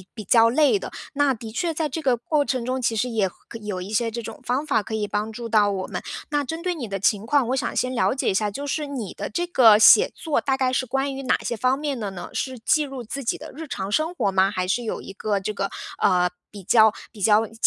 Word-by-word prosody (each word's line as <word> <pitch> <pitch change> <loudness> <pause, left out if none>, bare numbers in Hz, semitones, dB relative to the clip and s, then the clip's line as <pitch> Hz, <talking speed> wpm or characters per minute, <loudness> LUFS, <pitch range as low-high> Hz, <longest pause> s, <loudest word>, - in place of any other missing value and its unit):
比 215 - -6
较 230 +2 +5
累 300 - +3
的。 - - -7 0.2
那 285 -2 +2
的 225 -1 -9
确 330 +9 -1
在 315 -1 -1
这 320 +4 -4
个 260 -5 +2
过 290 +5 0
程 255 -4 -2
中， 255 0 -2
其 230 -1 0
实 220 +3 0
也 220 -5 0
可 225 +5 -12
有 205 -3 -4
一 185 +3 -7
些 230 +1 +1
这 235 +1 -5
种 - - -8
方 255 +5 -1
法 280 -7 +2
可 220 - -5
以 210 -1 -1
帮 210 +2 -2
助 235 +1 -6
到 215 -2 +3
我 190 -2 -3
们。 - - -5 0.3
那 290 -1 0
针 325 +5 -5
对 365 -1 0
你 270 -9 -5
的 195 -1 -4
情 210 +2 +1
况， 280 -3 +2
我 260 - +1
想 - - -2
先 255 0 0
了 250 +2 +1
解 270 - 0
一 - - -1
下， 205 +2 +1
就 280 +8 -6
是 295 +1 -2
你 245 -9 -5
的 - - -5
这 345 +11 -1
个 235 -11 +6
写 425 - +7
作 315 -3 -1
大 270 -1 0
概 260 -1 +1
是 255 0 0
关 270 +2 -1
于 270 - -5
哪 255 - +2
些 235 - -2
方 255 +4 +1
面 285 -4 -3
的 205 -2 -3
呢？ 180 -2 -8
是 260 -1 -3
记 300 +6 +2
录 270 -2 -7
自 275 +5 -5
己 235 - -1
的 - - -10
日 320 +1 -7
常 195 -6 -4
生 315 +9 0
活 200 - 0
吗？ 190 +1 +3
还 185 -3 -2
是 240 +6 0
有 225 - -3
一 195 - -9
个 205 0 -1
这 205 +2 -4
个， 195 -1 -2 0.3
呃， 180 -1 +3 0.2
比 200 -2 -11
较 220 +1 +5 0.2
比 210 -3 -12
较 215 +2 +4
习 220 - -18
235 Hz, 300 characters per minute, -23 LUFS, 210-275 Hz, 0.3 s, 写